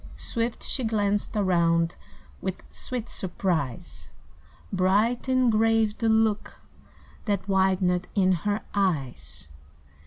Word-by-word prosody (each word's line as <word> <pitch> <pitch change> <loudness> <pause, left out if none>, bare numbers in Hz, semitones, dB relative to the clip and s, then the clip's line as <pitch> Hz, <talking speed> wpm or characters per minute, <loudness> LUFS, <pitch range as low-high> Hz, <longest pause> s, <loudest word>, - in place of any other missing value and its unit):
Swift 230 0 -3
she 260 - -2
glanced 205 -1 0
around 170 -4 +2 0.5
with - - -4
Sweet 230 - -5
surprise; 140 - -3 0.6
Bright 205 +7 +2
and 255 -2 +3
grave 220 -1 +2
the 225 - +1
look 220 -1 +1 0.7
that 200 -3 -1
Widened 190 -2 +2
in 190 -2 +4
her 205 +4 0
eyes. 130 - -2
195 Hz, 100 wpm, -26 LUFS, 175-220 Hz, 0.7 s, in